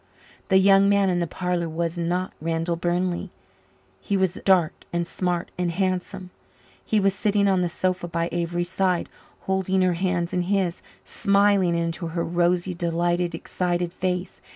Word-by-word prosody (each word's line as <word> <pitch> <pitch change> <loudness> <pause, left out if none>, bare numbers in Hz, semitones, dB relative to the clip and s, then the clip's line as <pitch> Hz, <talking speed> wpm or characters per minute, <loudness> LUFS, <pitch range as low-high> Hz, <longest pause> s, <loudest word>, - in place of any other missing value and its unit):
The 190 - +4
young 195 +1 +5
man 200 -1 +3
in 175 - 0
the 170 - -1
parlour 180 -1 -2
was 165 +1 -2
not 175 +2 -2
Randall 165 +1 -1
Burnley. 175 +2 -1 0.7
He 195 - -1
was 190 -1 0
dark 180 -5 +4 0.2
and 170 0 -1
smart 175 -1 -2
and 180 -1 +1
handsome; 185 +1 -2 0.5
he 215 - +1
was 195 -1 +2
sitting 205 -1 +1
on 190 -2 +3
the 175 - 0
sofa 185 0 -1
by 170 0 -1
Avery's 175 0 -2
side, 185 -2 0 0.3
holding 190 0 0
her 180 -1 +3
hands 175 -1 -1
in 180 - +1
his, 185 -1 0 0.2
smiling 200 -4 +3
into 170 +1 -2
her 170 +1 -2
rosy, 175 +2 +1
delighted, 175 0 0
excited 175 0 -2
face. 180 0 -3
180 Hz, 155 wpm, -24 LUFS, 170-190 Hz, 0.7 s, young